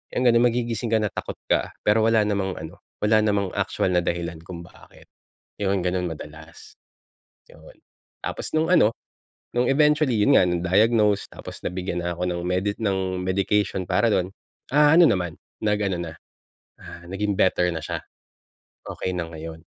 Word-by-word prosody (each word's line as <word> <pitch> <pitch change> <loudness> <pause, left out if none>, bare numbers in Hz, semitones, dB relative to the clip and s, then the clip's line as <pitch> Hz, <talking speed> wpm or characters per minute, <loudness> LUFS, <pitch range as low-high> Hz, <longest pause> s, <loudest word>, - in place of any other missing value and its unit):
Yun 125 - +1
nga 120 - +6
na 115 - +4
magigising 120 -1 0
ka 110 - +4
na 105 - -1
takot - - -5 0.2
ka - - +1
pero 105 +2 +3
wala 110 -1 +4
namang 100 -2 -1
ano, 80 0 -9 0.2
wala 110 +1 +4
namang 100 -3 +1
actual 95 - -1
na 90 - +3
dahilan 85 -1 -3
kung 85 +1 -9
bakit. 85 - -18 0.6
Yun 100 0 +1
ganun 90 -1 -1
madalas, 80 +1 -11 0.7
yun. - - -17 0.5
Tapos, - - -4
nung 160 +1 +2
ano 115 -11 +5 0.6
nung 120 +1 +1
eventually, 150 -1 +3
yun 140 +6 +6
nga - - +4
na-diagnose 100 +4 +2
tapos - - -10
nabigyan 90 -1 -3
na 85 - -1
ako 85 - -6
ng 90 -1 -1
medi 90 +3 0
ng 95 -4 -1
medication 95 +1 0
para 90 +6 +1
dun. 90 0 0 0.4
Ah 150 +2 +5
ano 170 -4 +7
naman 90 -5 -1 0.2
nag-ano 105 -4 0
na, 85 -2 -5 0.7
ah, 85 - -11
naging 95 +2 -2
better 90 -1 +3
na 80 -3 -4
siya, - - -4 0.9
okey - - -4
na 85 - -2
ngayon. 80 0 -8
95 Hz, 165 wpm, -24 LUFS, 90-110 Hz, 0.9 s, ano